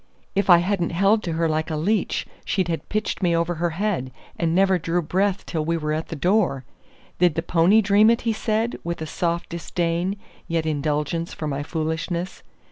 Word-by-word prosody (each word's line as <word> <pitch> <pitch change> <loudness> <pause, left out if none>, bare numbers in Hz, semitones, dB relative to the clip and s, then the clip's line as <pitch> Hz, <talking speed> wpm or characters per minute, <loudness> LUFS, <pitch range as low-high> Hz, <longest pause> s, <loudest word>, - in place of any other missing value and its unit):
"If 200 0 0
I 175 - +9
hadn't 175 -1 0
held 200 +5 +3
to 170 -4 -3
her 165 +1 +1
like 155 +1 -1
a 160 - -2
leech, 195 +7 0 0.2
she'd 185 -3 -1
have 165 - -3
pitched 215 0 -2
me 175 -2 +2
over 170 +1 +1
her 175 - +2
head, 185 -11 -1 0.2
and 165 -1 0
never 190 -1 +4
drew 170 +2 0
breath 190 +4 0
till 160 -3 -2
we 165 +2 0
were 150 -1 -2
at 155 +1 -3
the - - -5
door. 175 - +1 0.5
Did 175 -3 +4
the 165 - -1
pony 180 +6 +4
dream 205 +2 +5
it?" 235 - +2
he 230 -1 0
said, 220 +2 -1
with 170 -1 -3
a - - -3
soft 170 +2 -2
disdain, 170 +2 -2 0.3
yet 165 -1 -1
indulgence 150 +2 -1
for 155 - -5
my 145 -1 -2
foolishness. 165 +4 -3
170 Hz, 200 wpm, -23 LUFS, 160-195 Hz, 0.5 s, I